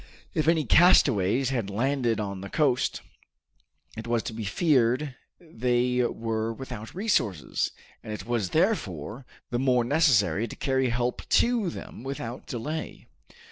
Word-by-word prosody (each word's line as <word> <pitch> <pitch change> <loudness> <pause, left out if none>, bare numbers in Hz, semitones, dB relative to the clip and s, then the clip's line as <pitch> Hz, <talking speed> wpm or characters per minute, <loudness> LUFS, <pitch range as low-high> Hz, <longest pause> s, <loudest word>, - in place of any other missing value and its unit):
If 155 -3 0
any 160 -2 +3
castaways 130 - +4
had 115 -7 -2
landed 120 +1 0
on 100 -2 -4
the 100 - -7
coast, 135 -5 +1 0.9
it 110 +1 -7
was 115 -1 0
to - - -5
be 110 0 -5
feared 130 - +2 0.3
they 125 -4 0
were 115 -1 -2
without 120 -1 -8
resources, 175 - 0 0.3
and 110 - -8
it 105 - -6
was 115 -6 -1
therefore 125 - -1 0.2
the 120 - 0
more 125 -2 +3
necessary 120 - +3
to - - -9
carry 130 -1 0
help 120 +1 -2
to 235 -6 +3
them 160 - -9
without 130 -2 -6
delay. 150 +7 -5
125 Hz, 140 wpm, -27 LUFS, 110-140 Hz, 0.9 s, castaways